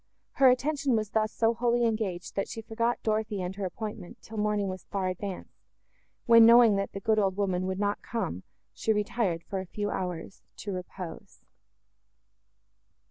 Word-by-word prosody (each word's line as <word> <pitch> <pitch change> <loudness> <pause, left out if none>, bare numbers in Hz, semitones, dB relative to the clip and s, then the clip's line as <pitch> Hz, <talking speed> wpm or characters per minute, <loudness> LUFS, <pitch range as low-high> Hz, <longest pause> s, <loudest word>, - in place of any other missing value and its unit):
Her 265 -2 +5
attention 275 0 +1
was 215 -2 -1
thus 215 -1 +1
so 230 0 +2
wholly 240 0 +1
engaged, 215 -6 -2
that 195 - -1
she 225 - -7
forgot 230 +2 0
Dorothée 215 -3 -1
and 180 +1 -5
her 200 -1 -3
appointment, 210 -1 -6
till 220 - -9
morning 210 -1 +1
was 185 -1 -6
far 195 -2 -2
advanced, 185 +1 -6 0.6
when, 230 -1 +8
knowing 230 -2 +8
that 195 0 -2
the 195 - -4
good 215 +2 +2
old 195 -2 +1
woman 185 -2 0
would 190 0 -2
not 205 0 -1
come, 200 - -3 0.3
she 220 - 0
retired, 210 -5 0
for 195 - -4
a 190 - -5
few 205 +3 -3
hours, 180 0 -4 0.2
to 205 - -5
repose. 180 -1 -8
210 Hz, 170 wpm, -28 LUFS, 190-225 Hz, 0.6 s, when